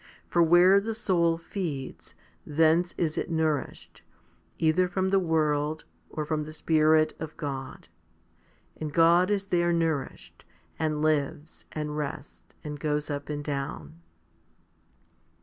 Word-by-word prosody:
For 170 - +2
where 175 +4 +6
the 225 +2 -4
soul 170 -6 +1
feeds, 165 -6 -6 0.3
thence 165 +3 +2
is 160 -3 0
it - - -4
nourished, 160 -3 -2 0.6
either 165 +3 +2
from 190 +1 -1
the 195 - +4
world, 155 -2 0 0.2
or 155 - -4
from 150 0 -1
the 155 - -9
Spirit 155 0 +3
of 160 -1 -7
God; 135 -3 -6 0.9
and 155 -1 -5
God 170 +4 +4
is 200 -1 0
there 175 -2 +1
nourished, 165 -4 -2 0.4
and 155 -1 -1
lives, 150 0 -1
and 150 -1 -4
rests, 145 -1 -7
and 150 -1 -6
goes 150 +1 -1
up 145 0 -5
and 145 -1 -3
down. 110 - -5
155 Hz, 130 wpm, -27 LUFS, 150-170 Hz, 0.9 s, where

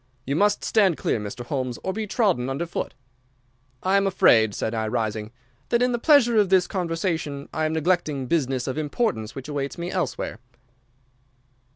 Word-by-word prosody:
You 140 - -1
must 205 +4 +2
stand 195 -7 +3
clear, - - 0
Mr. 120 +4 -6
Holmes, 130 -2 -3
or 190 - -2
be 215 +1 -3
trodden 195 - +1
under 140 +6 -2
foot.' 170 - -4 0.9
"'I 190 +1 +3
am 200 0 +2
afraid,' 110 - +4
said 110 - -2
I, 110 -1 -1
rising, 110 -1 -2 0.4
'that 235 +1 +3
in 250 - +2
the 240 - -1
pleasure 240 -4 +5
of 205 -3 +3
this 185 -2 +4
conversation 165 -5 -2
I 155 +1 0
am 155 - -1
neglecting 160 -4 0
business 135 -4 0
of 130 +3 -3
importance 150 - -2
which 135 0 -7
awaits 140 0 -3
me 175 +1 -4
elsewhere. 180 -9 -3
160 Hz, 175 wpm, -24 LUFS, 130-195 Hz, 0.9 s, pleasure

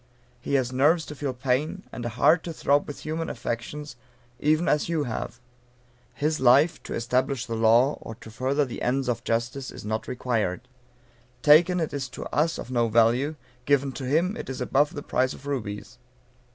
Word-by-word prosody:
He 140 - -2
has 130 -2 +1
nerves 155 +6 +3
to - - -7
feel 140 -1 -2
pain, 140 +9 -1
and 120 - -6
a 120 - -2
heart 125 +9 +4
to 170 - -4
throb 145 -2 +1
with 145 - -7
human 160 +1 -3
affections, 120 +6 -5 0.4
even 155 +3 +2
as 150 +2 +1
you 160 -3 0
have. 120 -1 -5 0.8
His 155 +1 0
life, 135 +6 +4
to - - -4
establish 125 +2 0
the 115 - -5
law, 115 +5 +4
or 115 - -8
to 110 -1 -13
further 135 +5 0
the 125 - -7
ends 130 +2 0
of 120 -1 -1
justice, 120 +4 -2
is - - -10
not 110 +1 -3
required. 115 -6 -1 0.8
Taken, 170 +4 +6
it 160 - -2
is 135 -2 -3
to - - -8
us 160 +2 +2
of 125 - -7
no 120 -2 +2
value; 120 +7 +3 0.3
given 140 -1 +2
to 130 0 -6
him, 165 +9 +1
it - - -7
is 130 - -5
above 145 +2 +1
the 145 - -5
price 130 +1 0
of 140 - -13
rubies. 125 -3 -5
135 Hz, 190 wpm, -26 LUFS, 120-150 Hz, 0.8 s, Taken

